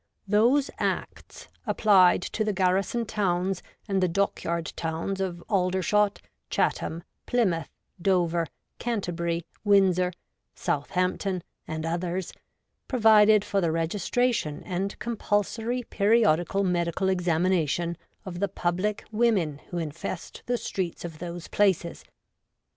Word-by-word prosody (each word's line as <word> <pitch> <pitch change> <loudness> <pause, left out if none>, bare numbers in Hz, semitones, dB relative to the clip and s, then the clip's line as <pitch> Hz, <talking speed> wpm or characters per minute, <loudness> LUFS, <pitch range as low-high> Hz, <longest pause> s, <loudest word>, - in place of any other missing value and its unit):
Those 235 +8 +3
Acts, - - -3 0.2
applied 185 -5 +5
to 215 - -2
the 210 -1 0
garrison 190 +5 +1
towns 190 -3 0 0.3
and 195 -2 +1
the 185 - +3
dockyard 170 -2 -1
towns 165 +4 -3
of 175 -3 -3
Aldershot, 195 +2 +1 0.3
Chatham, 165 +1 0 0.2
Ply 245 -1 +3
mouth, 165 -5 -1 0.3
Dover, 175 -3 +2 0.3
Canterbury, 170 -7 -2 0.2
Windsor, 190 -3 +4 0.4
Southampton, 180 +3 -1 0.2
and 160 0 -4
others, 175 +2 -2 0.5
provided 215 -3 +5
for 195 - 0
the 170 -2 +1
registration 170 +2 0
and 195 +1 -3
com 235 0 -4
pulsory 225 +5 -1
periodical 200 -3 +3
medical 175 0 0
examination 175 -2 +1 0.3
of 175 -2 -6
the 200 - +1
public 185 +3 -1
women 210 -10 +1
who 175 - -4
infest 165 +2 -5
the 245 0 +1
streets 180 -6 -4
of 160 -3 -8
those 175 -1 -6
places. 190 -4 +1
185 Hz, 115 wpm, -27 LUFS, 170-205 Hz, 0.5 s, applied